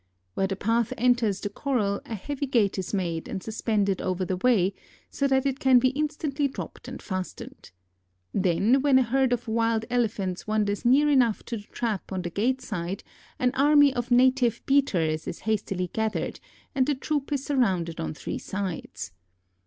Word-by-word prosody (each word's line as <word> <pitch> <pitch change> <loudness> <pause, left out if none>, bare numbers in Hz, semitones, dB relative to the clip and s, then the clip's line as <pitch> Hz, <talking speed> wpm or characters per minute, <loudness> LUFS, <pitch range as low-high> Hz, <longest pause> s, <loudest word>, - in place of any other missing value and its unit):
Where 195 - 0
the 195 - -2
path 225 +3 0
enters 235 -5 +2
the 205 - -2
corral 210 -5 -1
a 225 - -4
heavy 280 +7 -4
gate 210 -7 +2
is 185 - -4
made 170 -5 -2
and 190 - -5
suspended 210 -3 0
over 185 0 -1
the 185 0 -2
way, 200 -3 +3 0.4
so 280 - 0
that 265 0 +2
it 270 -1 -1
can 260 -1 +5
be 255 +1 +4
instantly 295 0 -1
dropped 270 - -8
and - - -7
fastened. 185 -2 -6 0.6
Then, 195 +8 +3
when 280 -2 +4
a 260 - +5
herd 260 +2 +1
of 245 0 -1
wild 225 0 +1
Elephants 210 -7 -1
wanders 210 -1 0
near 275 +5 +5
enough 250 -7 +3
to 235 - -4
the 210 - -11
trap 220 -6 -3
on 185 -1 -2
the 175 - -4
gate 255 +8 0
side 185 -1 -4 0.3
an 250 0 +2
army 290 0 +5
of 245 0 -3
native 250 -1 +3
beaters 175 - +1
is - - -5
hastily 195 -4 -2
gathered 220 -1 -2 0.3
and 265 -2 +2
the 295 - +2
troop 290 +1 -2
is 280 -2 -1
surrounded 190 - 0
on 80 -1 -3
three - - -5
sides. 180 - -5
225 Hz, 175 wpm, -26 LUFS, 195-260 Hz, 0.6 s, can